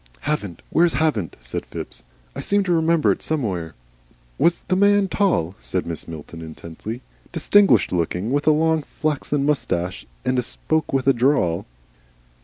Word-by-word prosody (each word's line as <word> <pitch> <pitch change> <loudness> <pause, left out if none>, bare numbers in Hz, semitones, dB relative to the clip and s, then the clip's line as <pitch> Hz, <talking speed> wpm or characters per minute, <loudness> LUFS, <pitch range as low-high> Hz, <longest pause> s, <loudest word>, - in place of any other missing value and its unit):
"Havant! 105 - -3
Where's 170 0 +4
Havant?" 130 - 0
said - - -5
Phipps. - - -7 0.3
"I - - -5
seem 205 0 +2
to 185 - -1
remember 165 -1 +3
it - - -2
somewhere." 95 - -2 0.6
"Was 170 - +3
the 185 - 0
man 200 +1 +4
tall?" 180 - +1
said 90 - -1
Mrs. 85 -1 -6
Milton, 80 +1 -8
intently, 85 +9 -8 0.3
"distinguished 195 - +4
looking? 90 +5 -1
with 145 +2 0
a - - +8
long, 160 +1 +2
flaxen 145 -1 -2
moustache? 90 - -1 0.2
and 125 -1 +1
spoke 155 +5 -1
with 135 -1 0
a 135 - +5
drawl?" 120 - +1
135 Hz, 150 wpm, -22 LUFS, -, 0.6 s, a